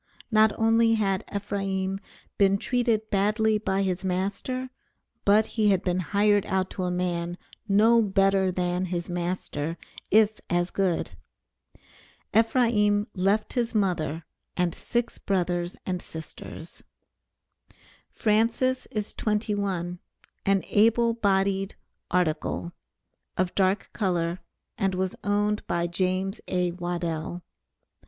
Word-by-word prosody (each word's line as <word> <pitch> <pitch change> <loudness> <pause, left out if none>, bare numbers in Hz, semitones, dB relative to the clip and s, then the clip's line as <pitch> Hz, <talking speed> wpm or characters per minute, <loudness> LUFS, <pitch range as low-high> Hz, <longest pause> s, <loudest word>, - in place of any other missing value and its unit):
Not 215 0 +5
only 225 0 +4
had 195 -2 0
Ephraim 195 -1 -2 0.4
been 195 0 +5
treated 230 -1 0
badly 215 +2 +2
by 195 -2 0
his 185 0 -1
master 200 +8 -2 0.5
but 210 +2 +5
he 215 -2 +1
had 190 -2 +2
been 180 0 0
hired 205 +2 +3
out 190 -1 0
to 185 - -3
a - - 0
man 175 -1 -2 0.3
no 220 +3 +5
better 195 -2 +3
than 180 0 -1
his 175 -1 -3
master, 170 -3 -3 0.3
if 215 0 +4
as 175 0 +1
good. 190 -4 0 1.2
Ephraim 225 -3 +3
left 200 +3 +1
his 240 -2 -1
mother 170 -5 0 0.3
and 180 -2 +1
six 240 -1 -2
brothers 175 -2 -1
and 180 -1 -2
sisters. 160 +1 -9 1.3
Francis 230 +4 +1
is 215 -4 -4
twenty 210 0 -1
one, 180 -3 -2 0.5
an 195 -1 +3
able 230 +2 +4
bodied 195 -3 +1 0.3
"article," 170 -1 0 0.7
of 185 -1 0
dark 190 +1 +1
color, 175 -4 0 0.4
and 195 -1 +1
was 185 0 -1
owned 205 +1 +1
by 170 0 0
James 185 +2 -1
A. 180 -1 0
Waddell. 175 -1 -3
195 Hz, 115 wpm, -26 LUFS, 180-215 Hz, 1.3 s, Not